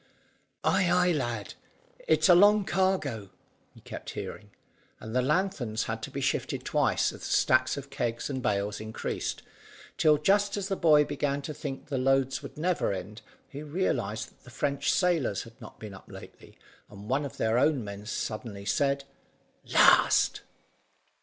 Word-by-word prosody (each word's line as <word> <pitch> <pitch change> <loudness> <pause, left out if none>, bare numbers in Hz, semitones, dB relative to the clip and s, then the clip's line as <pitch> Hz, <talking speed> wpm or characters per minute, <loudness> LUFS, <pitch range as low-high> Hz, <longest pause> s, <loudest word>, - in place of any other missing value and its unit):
"Ay, 180 -3 +2
ay, 180 0 +3
lad, 120 -9 -3 0.5
it's 455 - +4
a 180 - +8
long 205 +3 +6
cargo," 175 - 0 0.4
he - - -18
kept - - -8
hearing; 105 -1 -7 0.5
and 110 +2 -7
the 125 - +3
lanthorns 135 - 0
had 110 0 -4
to 110 - -5
be 140 0 -5
shifted 135 0 -2
twice - - +1
as - - -11
the - - -9
stacks 130 +1 +2
of 140 0 -8
kegs 120 -3 -2
and 130 -2 -4
bales 105 -3 -1
increased, 110 0 -4 0.6
till 155 -1 +5
just 200 +6 +2
as 200 0 -3
the 195 - 0
boy 150 -4 +5
began 145 -1 -2
to 155 - -5
think 140 -2 -6
the 135 -3 -1
loads 135 0 +1
would - - -10
never 175 - 0
end, 100 +3 -6 0.3
he 145 - -8
realised 130 - -2
that - - -29
the - - -14
French 140 +4 -1
sailors 165 - +1
had 115 +3 -16
not 105 - -12
been 105 -2 -8
up 95 - -14
lately, - - -13 0.3
and 105 0 -11
one 135 +4 0
of 140 - -7
their 110 +2 +1
own 140 -3 +2
men 100 0 -8
suddenly 110 -2 -5
said 140 +5 +1 0.7
"Last!" - - +5
135 Hz, 165 wpm, -28 LUFS, 110-155 Hz, 0.7 s, a